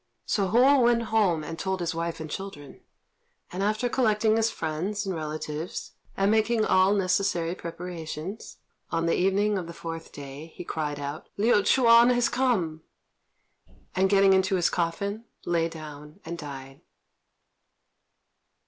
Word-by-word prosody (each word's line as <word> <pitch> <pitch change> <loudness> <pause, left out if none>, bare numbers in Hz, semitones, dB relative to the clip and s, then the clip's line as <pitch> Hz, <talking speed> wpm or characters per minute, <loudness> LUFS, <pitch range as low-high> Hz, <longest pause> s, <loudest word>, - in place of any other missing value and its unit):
So 200 -2 +1
Hou 260 +7 +5
went 240 -1 +3
home 185 -8 +3
and 165 +1 -6
told 190 -1 -2
his 175 0 -2
wife 165 0 -3
and 160 - -5
children; 150 -5 -8 0.7
and 180 - -4
after 215 +4 +1
collecting 220 -3 +2
his 225 0 +2
friends 185 +4 -3
and 190 - -2
relatives, 155 0 -5 0.3
and 195 +1 +3
making 220 0 +2
all 190 +2 +4
necessary 185 -3 +1
preparations, 170 +2 -7 0.3
on 165 0 -1
the 165 - +2
evening 200 +2 +2
of 175 - -6
the 170 - -9
fourth 165 -1 -7
day 145 +3 -9
he - - -7
cried 150 -3 -3
out, 145 +2 -6
"Liu 220 +4 +3
Ch'üan 235 +1 +6
has 245 0 +2
come!" 195 -12 0 1.1
and, 190 0 +3
getting 195 -1 +5
into 190 +1 +2
his 175 -2 +2
coffin, 200 +6 -2 0.2
lay 170 -1 +1
down 150 0 -10
and 170 +1 -4
died. 135 -3 -9
185 Hz, 145 wpm, -27 LUFS, 160-210 Hz, 1.1 s, Ch'üan